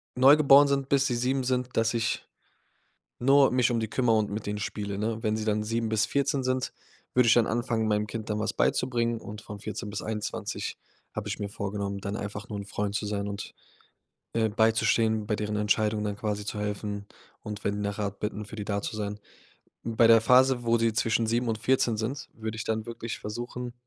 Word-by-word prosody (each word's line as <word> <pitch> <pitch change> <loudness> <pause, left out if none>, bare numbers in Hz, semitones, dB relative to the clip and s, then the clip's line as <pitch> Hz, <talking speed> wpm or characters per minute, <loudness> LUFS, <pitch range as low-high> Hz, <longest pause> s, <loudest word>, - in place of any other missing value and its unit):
neugeboren 140 +2 +7
sind, 140 -1 0
bis 135 -1 +3
sie 125 - 0
7 130 +2 0
sind, 125 0 -1
dass 115 +1 +2
ich 115 -1 -1 0.9
nur 135 +2 +5
mich 125 -1 +3
um 115 - +1
die 110 -1 -2
kümmere 115 -2 +2
und 105 -2 0
mit 105 +1 -4
denen 105 0 -2
spiele, 100 -1 -4
ne? 110 +2 -2
Wenn 110 -1 +1
sie 110 - -3
dann 105 -1 +1
7 115 +1 -1
bis 110 0 +2
14 140 +1 0
sind, 130 0 -1 0.4
würde 125 -1 +4
ich 110 - +7
dann 120 -2 +4
anfangen, 115 -1 0
meinem 105 0 +1
Kind 110 0 -6
dann 105 0 -1
was 110 - 0
beizubringen, 120 -2 +1
und 105 +1 -8
von 105 -2 -9
14 105 +1 -5
bis 105 - -4
21 110 -1 -4 0.4
habe 105 -1 -4
ich 105 - -3
mir 105 - -2
vorgenommen, 100 0 -3
dann 100 +2 -3
einfach 105 0 -6
nur 105 -2 -4
'n 100 - -6
Freund 100 0 -3
zu 105 - -1
sein 100 -1 -2
und, 100 0 -6 0.8
ähm, 110 -2 +1
beizustehen, 110 -1 +2
bei 105 - +1
deren 105 0 -2
Entscheidungen 105 0 +1
dann 105 -1 -2
quasi 105 -1 -3
zu 105 +1 -4
helfen 105 0 -3 0.4
und, 105 -1 -7
wenn 100 - 0
die 105 - -3
nach 100 0 -3
Rat 100 -1 -3
bitten, 105 0 -3
für 110 - -9
die 105 - -4
da 100 -1 -1
zu - - -4
sein. 105 0 -3 0.7
Bei 115 0 +4
der 115 -1 +7
Phase, 125 +1 +5
wo 115 0 +3
sie 115 -1 +1
zwischen 115 0 +1
7 120 +2 +1
und 110 - 0
14 120 -1 +2
sind, 125 +7 -4
würde 110 0 -5
ich 110 - -3
dann 110 -1 -2
wirklich 115 -1 -6
versuchen, 120 +3 -5
110 Hz, 215 wpm, -28 LUFS, 105-120 Hz, 0.9 s, neugeboren